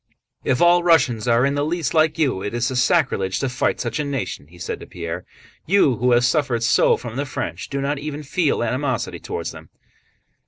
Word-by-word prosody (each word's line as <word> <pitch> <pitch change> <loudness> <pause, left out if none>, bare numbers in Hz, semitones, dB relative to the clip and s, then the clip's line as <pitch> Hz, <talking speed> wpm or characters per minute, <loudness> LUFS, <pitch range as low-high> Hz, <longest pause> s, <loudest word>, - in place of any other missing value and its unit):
"If 130 +5 +2
all 175 0 +5
Russians 135 -10 +3
are 120 +2 +4
in 140 - +1
the 145 0 0
least 160 -1 -1
like 155 -1 +3
you, 135 -12 +1
it 105 +3 -4
is 120 0 0
sacrilege 125 - +1
to 135 - -1
fight 130 - -1
such 120 +3 -3
a - - +1
nation," 135 - -4
he 90 +3 -17
said - - -5
to - - -11
Pierre. 85 -1 -6 0.4
"You, 155 - +4
who 125 +2 +2
have 120 +1 +4
suffered 130 -6 +1
so 115 - +4
from 120 0 -7
the 140 - -1
French, 85 -9 -5
do 140 - -3
not 140 +1 -1
even 150 0 -5
feel 150 -3 0
animosity 130 +3 -2
toward - - -5
them." - - -12
130 Hz, 205 wpm, -21 LUFS, 120-150 Hz, 0.4 s, all